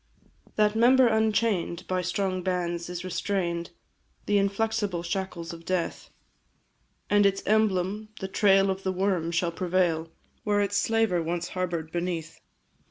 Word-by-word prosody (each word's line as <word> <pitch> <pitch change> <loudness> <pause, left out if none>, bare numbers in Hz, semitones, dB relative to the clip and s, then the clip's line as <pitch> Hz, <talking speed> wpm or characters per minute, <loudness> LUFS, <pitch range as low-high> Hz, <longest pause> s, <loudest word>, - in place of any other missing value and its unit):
That 210 0 +3
member 250 +3 +6
unchain'd, 220 -5 +1
by 185 0 0
strong 185 +1 -1
bands 175 -1 -2
is 175 0 -5
restrain'd, 180 -2 -2 0.6
The 205 0 +3
inflexible 200 -2 -1
shackles 175 -2 -4
of 165 0 -10
death; 180 -1 -2 1.0
And, 205 0 +4
its 195 -1 +2
emblem, 210 -1 +1
the 190 - -3
trail 195 0 +4
of 190 0 -4
the 190 - -1
worm, 185 -3 0
shall 170 0 0
prevail 170 -2 0 0.3
Where 205 -1 +1
its 205 0 +1
slaver 225 -5 +2
once 170 +1 -3
harbour'd 170 -3 -3
beneath. 170 -2 -3
185 Hz, 135 wpm, -27 LUFS, 175-205 Hz, 1.0 s, member